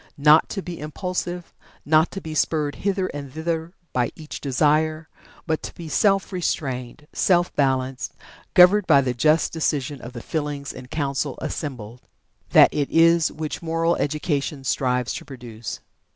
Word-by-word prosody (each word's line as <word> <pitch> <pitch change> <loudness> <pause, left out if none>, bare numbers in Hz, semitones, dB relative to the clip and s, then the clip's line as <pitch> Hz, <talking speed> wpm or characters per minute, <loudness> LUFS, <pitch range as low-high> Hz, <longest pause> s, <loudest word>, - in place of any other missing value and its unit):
Not 150 +2 +5
to 195 - -4
be 175 -1 -7
impulsive 175 +3 -4 0.3
not 155 +2 +4
to 195 - -7
be 160 -2 -6
spurred 150 -1 0
hither 195 -1 0
and 140 -2 -7
thither 160 +2 -3 0.2
by 125 -2 +1
each 155 -1 -8
desire 155 +3 +1 0.4
but 160 -1 -1
to - - -8
be 170 - -8
self 195 +5 +2
restrained, 135 -6 -3
self 175 -1 +2
balanced, 130 -2 0 0.4
governed 185 +2 +7
by 140 -4 +6
the 130 -2 -1
just 155 +6 +2
decision 145 -4 -1
of 120 +3 -9
the 120 - -8
feelings 145 -3 -3
in 130 -1 -10
council 140 -1 -2
assembled 125 -6 -5 0.5
that - - +7
it 145 -2 -1
is 165 0 +4
which 155 0 -5
moral 165 0 +1
education 150 -1 -2
strives 125 -2 0
to - - -6
produce." 120 -5 -8
150 Hz, 150 wpm, -23 LUFS, 135-165 Hz, 0.5 s, governed